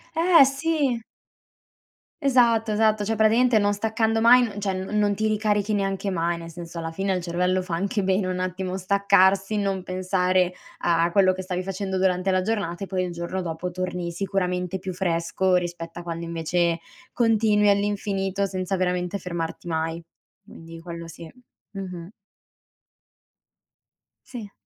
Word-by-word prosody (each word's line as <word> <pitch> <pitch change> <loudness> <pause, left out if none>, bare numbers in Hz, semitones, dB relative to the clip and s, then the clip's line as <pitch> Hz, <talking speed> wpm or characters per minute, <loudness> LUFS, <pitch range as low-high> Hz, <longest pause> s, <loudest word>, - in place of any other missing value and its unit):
Eh, 335 -2 +6
sì. 275 -2 0 1.2
Esatto, 235 -5 +3
esatto, 215 -1 +2
cioè 225 +2 0
praticamente 220 +2 +4
non 205 0 +2
staccando 220 +1 0
mai 245 +2 +7
n 220 -4 -2
cioè 195 -1 -1
non 190 +3 -3
non 205 -1 +2
ti 215 +2 0
ricarichi 210 -1 +1
neanche 195 0 -1
mai, 170 -2 -1
nel 165 0 -8
senso 170 0 -8
alla 165 0 -4
fine 195 +4 -2
al 185 -1 0
cervello 180 +2 0
fa 180 -2 -3
anche 200 +4 -1
bene 190 +1 +1
un 185 0 -2
attimo 185 0 -3
staccarsi, 195 +1 +3
non 195 -2 -1
pensare 185 0 +1 0.3
a 170 0 +2
quello 190 +1 +4
che 185 0 -6
stavi 180 -1 -3
facendo 190 0 -3
durante 185 0 +1
la 185 0 +2
giornata 195 -3 -2
e - - -16
poi 185 -1 -1
il 180 - -3
giorno 170 +2 -4
dopo 170 +1 -4
torni, 180 -1 -4
sicuramente, 180 0 -2
più 185 0 -5
fresco 180 +1 0
rispetto 175 -1 -5
a - - -6
quando 170 0 -5
invece 170 +1 0 0.3
continui 220 -3 +3
all'infinito, 200 -1 0
senza 185 0 -2
veramente 180 +1 -1
fermarti 170 -1 -5
mai. 165 0 -2 0.4
Quindi 165 0 -12
quello 170 0 -8
sì. 165 0 -11 0.4
Mh-mh. 180 -3 -7 2.2
Sì. 225 -6 -8
190 Hz, 155 wpm, -24 LUFS, 175-205 Hz, 2.2 s, mai